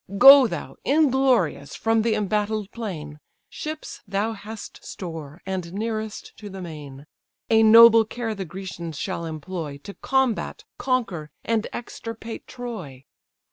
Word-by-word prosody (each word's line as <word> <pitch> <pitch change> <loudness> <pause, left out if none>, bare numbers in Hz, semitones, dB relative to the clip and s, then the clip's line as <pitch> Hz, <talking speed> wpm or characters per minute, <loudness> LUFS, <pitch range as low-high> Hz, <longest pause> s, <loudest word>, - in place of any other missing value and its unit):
Go 270 +3 +10
thou, - - -6
inglorious! 265 - +2
from 225 0 +2
the 220 0 +1
embattled 210 0 -1
plain; 155 -10 -6 0.3
Ships 310 0 -6
thou 205 +3 -1
hast 215 +1 -9
store, 165 -3 -8
and 185 -3 -4
nearest 215 0 -4
to 210 - -9
the 195 0 -8
main; 150 -5 -9 0.5
A 220 0 +6
noble 225 +1 +9
care 225 +1 -4
the 200 -2 -4
Grecians 170 -3 -7
shall 170 - -3
employ, 160 -1 -5
To 200 - -8
combat, 265 -2 0 0.2
conquer, 210 - -1 0.2
and 225 -1 0
extirpate 230 -1 -7
Troy. 195 - -7
210 Hz, 130 wpm, -24 LUFS, 170-230 Hz, 0.5 s, Go